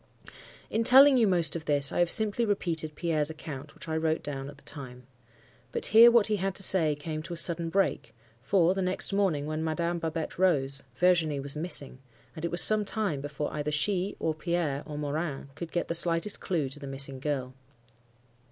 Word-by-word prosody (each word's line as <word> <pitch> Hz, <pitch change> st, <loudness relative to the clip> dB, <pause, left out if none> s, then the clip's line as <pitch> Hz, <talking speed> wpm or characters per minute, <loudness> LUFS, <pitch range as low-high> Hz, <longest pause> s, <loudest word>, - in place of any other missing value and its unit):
"In 225 Hz, -, 0 dB
telling 265 Hz, +3 st, +7 dB
you 235 Hz, -4 st, +3 dB
most 170 Hz, -5 st, +2 dB
of 165 Hz, -1 st, -6 dB
this, 145 Hz, -2 st, +1 dB
I -, -, -2 dB
have 175 Hz, -1 st, +2 dB
simply 220 Hz, +3 st, +3 dB
repeated 165 Hz, -7 st, -2 dB
Pierre's 155 Hz, -2 st, +3 dB
account, 150 Hz, -2 st, -9 dB
which -, -, -11 dB
I 160 Hz, -, -3 dB
wrote 160 Hz, 0 st, -1 dB
down 135 Hz, -1 st, -6 dB
at 145 Hz, -, -13 dB
the -, -, -17 dB
time. 125 Hz, -3 st, -8 dB, 0.7 s
But -, -, -4 dB
here 230 Hz, +2 st, +7 dB
what 235 Hz, -3 st, +4 dB
he 215 Hz, -1 st, 0 dB
had 195 Hz, 0 st, -3 dB
to 195 Hz, -, -2 dB
say 160 Hz, -6 st, +2 dB
came 155 Hz, +1 st, -6 dB
to 170 Hz, +2 st, -7 dB
a -, -, -9 dB
sudden 170 Hz, 0 st, +2 dB
break; 195 Hz, -, -1 dB, 0.3 s
for, 175 Hz, +5 st, +2 dB
the 190 Hz, -, -3 dB
next 185 Hz, +2 st, 0 dB
morning, 185 Hz, -8 st, 0 dB
when 155 Hz, +1 st, -4 dB
Madame 170 Hz, +2 st, -2 dB
Babette 165 Hz, 0 st, -5 dB
rose, 140 Hz, -7 st, +1 dB
Virginie 165 Hz, -3 st, +1 dB
was 140 Hz, +1 st, -4 dB
missing, 150 Hz, -5 st, -2 dB, 0.4 s
and 160 Hz, -, -9 dB
it 170 Hz, -, -1 dB
was 175 Hz, 0 st, +4 dB
some 215 Hz, -1 st, +3 dB
time 200 Hz, -9 st, -2 dB
before 145 Hz, +1 st, -5 dB
either 150 Hz, 0 st, -3 dB
she, 185 Hz, +6 st, -1 dB
or 160 Hz, -, -1 dB
Pierre, 155 Hz, -3 st, -2 dB
or 150 Hz, -, -7 dB
Morin, 150 Hz, -1 st, -4 dB
could 165 Hz, +3 st, -8 dB
get 175 Hz, -, -2 dB
the -, -, -2 dB
slightest 170 Hz, +3 st, +3 dB
clue 165 Hz, -7 st, -2 dB
to 135 Hz, -, -9 dB
the 140 Hz, -, -9 dB
missing 135 Hz, 0 st, 0 dB
girl. 130 Hz, -2 st, -4 dB
160 Hz, 205 wpm, -27 LUFS, 145-185 Hz, 0.7 s, telling